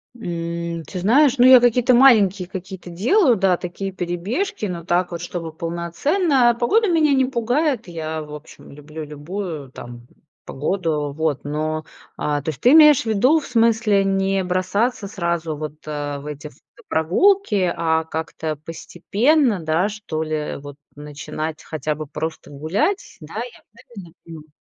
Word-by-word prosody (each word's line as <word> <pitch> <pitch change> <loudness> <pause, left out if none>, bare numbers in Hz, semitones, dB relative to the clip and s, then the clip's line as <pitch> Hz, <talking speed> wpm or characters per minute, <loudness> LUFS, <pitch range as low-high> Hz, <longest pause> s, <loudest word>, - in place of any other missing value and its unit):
Эм, 170 -5 -4
ты 185 - -6
знаешь, 265 +8 +4
ну, 245 - +5
я 255 0 +9
какие-то 245 +1 +3
маленькие 210 -8 +5
какие-то 190 -1 -8
делаю, 245 - +3
да, 190 -3 +2
такие 190 +2 -5
перебежки, 190 - -3
но 175 -4 -5
так 175 +1 0
вот, 170 0 -5
чтобы 170 -2 -6
полноценно. 240 - +1
Погода 425 - +2
меня 315 -4 +3
не 265 -1 +3
пугает, 255 - -1
я, 160 -2 -5
в 150 0 -11
общем, 150 +1 -12
люблю 150 +2 -9
любую, 150 -1 -6
там, 120 -1 -11 0.4
погоду. 150 -1 -2
Вот, 155 -3 -1
но, 155 +2 -3 0.3
а, 145 -1 -1
то 145 - -4
есть 155 - -5
ты 245 - +5
имеешь 300 -2 +7
в - - -19
виду, 245 +9 +3
в 300 - -10
смысле 225 -4 +2
не 195 0 0
бросаться 185 +5 -1
сразу 170 -4 -2
вот, 150 0 -6
а, 145 -1 -4
в 140 - -12
эти 150 0 -7
в - - -24 0.3
прогулки, 200 - +2
а 160 -1 +1
как-то 160 -1 -4
постепенно, 205 - 0
да, 160 +5 +1
что 200 -7 -4
ли, 155 -1 -3
вот, 145 0 -10 0.2
начинать 150 +1 -6
хотя 155 -1 -3
бы 150 0 -7
просто 160 +3 -6
гулять, 195 - -2
да, - - -11
я - - -6 0.2
правильно 195 -8 -12
понимаю? 155 -2 -11
175 Hz, 155 wpm, -21 LUFS, 155-235 Hz, 0.4 s, я